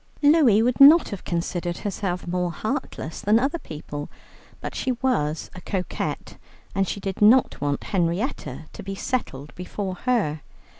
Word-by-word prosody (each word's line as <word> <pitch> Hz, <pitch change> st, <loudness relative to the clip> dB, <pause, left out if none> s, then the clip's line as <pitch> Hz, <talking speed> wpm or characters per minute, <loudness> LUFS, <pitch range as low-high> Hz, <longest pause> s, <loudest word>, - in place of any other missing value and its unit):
Louie 285 Hz, -8 st, +6 dB
would 245 Hz, +1 st, +1 dB
not 310 Hz, +5 st, +9 dB
have 200 Hz, -4 st, -6 dB
considered 175 Hz, 0 st, -2 dB
herself 190 Hz, -3 st, -3 dB
more 180 Hz, 0 st, -1 dB
heartless 215 Hz, -, -4 dB
than 210 Hz, +2 st, +4 dB
other 275 Hz, +7 st, 0 dB
people, 150 Hz, -, -7 dB, 0.5 s
but -, -, -6 dB
she 260 Hz, -, -1 dB
was 200 Hz, -, -1 dB
a 180 Hz, -, -10 dB
coquette, 185 Hz, -1 st, -4 dB, 0.4 s
and 195 Hz, -1 st, +1 dB
she 200 Hz, -, -3 dB
did 195 Hz, -1 st, -5 dB
not 230 Hz, -, +5 dB
want 145 Hz, 0 st, -1 dB
Henrietta 170 Hz, -, -2 dB
to -, -, -8 dB
be 195 Hz, 0 st, -5 dB
settled 150 Hz, -, -3 dB
before 185 Hz, +1 st, -4 dB
her. 185 Hz, -, 0 dB
195 Hz, 150 wpm, -24 LUFS, 170-240 Hz, 0.5 s, not